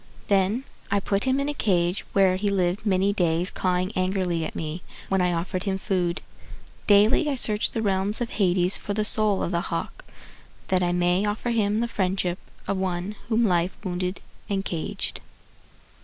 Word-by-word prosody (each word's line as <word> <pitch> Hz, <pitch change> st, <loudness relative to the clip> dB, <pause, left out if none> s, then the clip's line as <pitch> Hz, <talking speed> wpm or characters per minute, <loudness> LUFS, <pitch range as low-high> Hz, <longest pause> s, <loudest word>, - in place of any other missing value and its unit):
Then 200 Hz, +5 st, +2 dB, 0.3 s
I 200 Hz, -, +2 dB
put 200 Hz, +2 st, -1 dB
him 260 Hz, +1 st, +2 dB
in 280 Hz, -, -1 dB
a 295 Hz, -, -1 dB
cage 180 Hz, -7 st, +1 dB
Where 190 Hz, -2 st, +4 dB
he 205 Hz, +2 st, 0 dB
lived 190 Hz, +2 st, 0 dB
many 195 Hz, +1 st, +2 dB
days 175 Hz, -1 st, +1 dB
cawing 185 Hz, +1 st, 0 dB
angrily 185 Hz, -3 st, 0 dB
at -, -, -5 dB
me 160 Hz, +2 st, -4 dB, 0.3 s
When 190 Hz, -1 st, +2 dB
I 180 Hz, 0 st, +2 dB
offered 175 Hz, +2 st, -2 dB
him 195 Hz, -1 st, 0 dB
food. 180 Hz, -2 st, -1 dB, 0.6 s
Daily 215 Hz, +9 st, +5 dB
I 280 Hz, -, 0 dB
search 215 Hz, -4 st, +1 dB
the 225 Hz, -, -3 dB
realms 195 Hz, +1 st, +1 dB
of 240 Hz, -1 st, -3 dB
Hades 185 Hz, -2 st, +2 dB
For 205 Hz, -, -4 dB
the 215 Hz, 0 st, 0 dB
soul 210 Hz, -2 st, +3 dB
of -, -, -2 dB
the 170 Hz, -1 st, 0 dB
hawk, -, -, -4 dB, 0.7 s
That 185 Hz, -1 st, +4 dB
I 175 Hz, -1 st, +1 dB
may 180 Hz, +2 st, +2 dB
offer 215 Hz, +3 st, -2 dB
him 215 Hz, -1 st, +1 dB
the 235 Hz, -, 0 dB
friendship 185 Hz, -4 st, -1 dB, 0.3 s
Of 195 Hz, -, 0 dB
one 185 Hz, +2 st, -2 dB
whom 230 Hz, 0 st, +3 dB
life 180 Hz, -2 st, +1 dB
wounded 180 Hz, 0 st, -3 dB, 0.3 s
and 195 Hz, -1 st, -1 dB
caged. 165 Hz, -3 st, -3 dB
190 Hz, 180 wpm, -25 LUFS, 180-210 Hz, 0.7 s, Daily